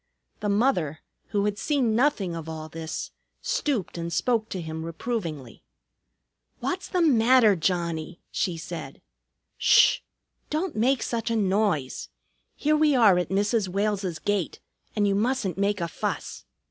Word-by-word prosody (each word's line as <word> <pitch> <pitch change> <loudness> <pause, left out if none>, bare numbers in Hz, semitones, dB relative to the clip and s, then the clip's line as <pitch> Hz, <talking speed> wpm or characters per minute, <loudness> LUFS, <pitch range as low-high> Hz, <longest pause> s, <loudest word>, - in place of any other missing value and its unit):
The 210 - -2
mother, 200 - +1 0.3
who 205 -2 0
had 205 -1 -1
seen 250 -2 +1
nothing 225 - +1
of 165 -1 -6
all 155 -1 -6
this, 160 0 -5 0.3
stooped 230 - -1
and 170 0 -4
spoke 225 +3 +1
to 185 - -4
him 160 -1 -5
reprovingly. 165 - -4 1.0
"What's 370 +1 -3
the 360 -2 +1
matter, 240 -6 +5
Johnnie?" 170 -1 -2
she 180 -4 -1
said. 160 - -7 0.6
"Sh! - - +6 0.5
Don't 315 +3 -2
make 250 +4 +2
such 230 -2 -2
a 230 - 0
noise. 195 -9 0 0.5
Here 305 +1 +2
we 305 -2 +4
are 210 -7 +6
at 175 - -2
Mrs. 205 +2 +1
Wales's 195 -2 -1
gate, 195 +1 -1 0.4
and 205 -2 +2
you 200 - +2
mustn't 210 -4 0
make 205 0 +1
a 170 - -1
fuss. - - -4
205 Hz, 145 wpm, -26 LUFS, 170-235 Hz, 1.0 s, Sh